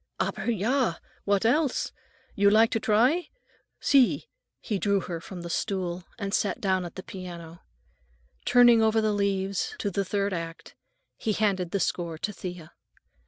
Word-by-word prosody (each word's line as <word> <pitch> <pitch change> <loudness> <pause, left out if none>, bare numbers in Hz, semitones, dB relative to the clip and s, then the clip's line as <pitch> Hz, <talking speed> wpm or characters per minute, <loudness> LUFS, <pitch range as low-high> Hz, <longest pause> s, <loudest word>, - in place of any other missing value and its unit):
"Aber - - -1
ja! 230 -1 +1 0.3
What 200 +1 +2
else? 285 +3 +1 0.4
You 200 0 +4
like 220 +2 +5
to 225 - +1
try? 250 +11 +2 0.5
See." 275 - +3 0.3
He 210 -4 -3
drew 200 0 +2
her 170 -3 -5
from 180 0 -8
the 170 - -6
stool 185 -3 -2
and 200 -3 -4
sat 205 - 0
down 190 -2 0
at 170 - -9
the 185 - -7
piano. 170 -3 -9 0.8
Turning 240 -2 +6
over 220 0 +3
the 215 -1 +1
leaves 195 -1 -1
to 205 - -2
the 200 +2 0
third 200 +1 -1
act, 165 -1 -6 0.4
he 220 - -1
handed 195 -4 0
the 200 - -1
score 170 -3 -2
to 210 +6 -3
Thea. 180 -4 -8
200 Hz, 160 wpm, -27 LUFS, 180-220 Hz, 0.8 s, Turning